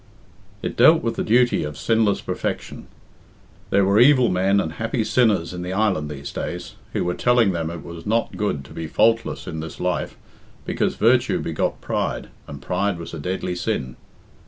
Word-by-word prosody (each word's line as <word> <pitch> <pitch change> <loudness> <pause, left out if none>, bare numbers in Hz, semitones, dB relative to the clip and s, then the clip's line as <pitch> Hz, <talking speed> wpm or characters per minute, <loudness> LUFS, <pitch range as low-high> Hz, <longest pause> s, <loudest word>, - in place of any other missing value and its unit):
It - - -3
dealt 160 +1 +6
with 115 -1 0
the - - -1
duty 120 +2 +3
of 75 -1 -5
sinless 110 0 +1
perfection. - - -4 0.8
There 100 0 +3
were 100 +2 +3
evil 130 -2 +6
men 95 +2 +2
and 80 -5 -1
happy 115 +3 -1
sinners 105 -8 +2
in 90 - -5
the 90 +1 -4
island 95 -7 +1
these 70 -1 -7
days, - - -5 0.2
who - - 0
were 90 - -1
telling 120 -3 +3
them 85 -3 -2
it 85 -1 -7
was 85 0 -9
not 115 +2 0
good 75 -10 -2
to - - -13
be 80 -1 -5
faultless 115 +7 +1
in 80 - -5
this 80 +1 -7
life, 90 0 -2 0.5
because - - -1
virtue - - +3
begot - - -2
pride, - - -2 0.2
and 70 -2 -9
pride 100 -2 0
was 85 0 -8
a 80 - -5
deadly 90 +3 -3
sin. 65 -8 -3
95 Hz, 180 wpm, -22 LUFS, 80-110 Hz, 0.8 s, dealt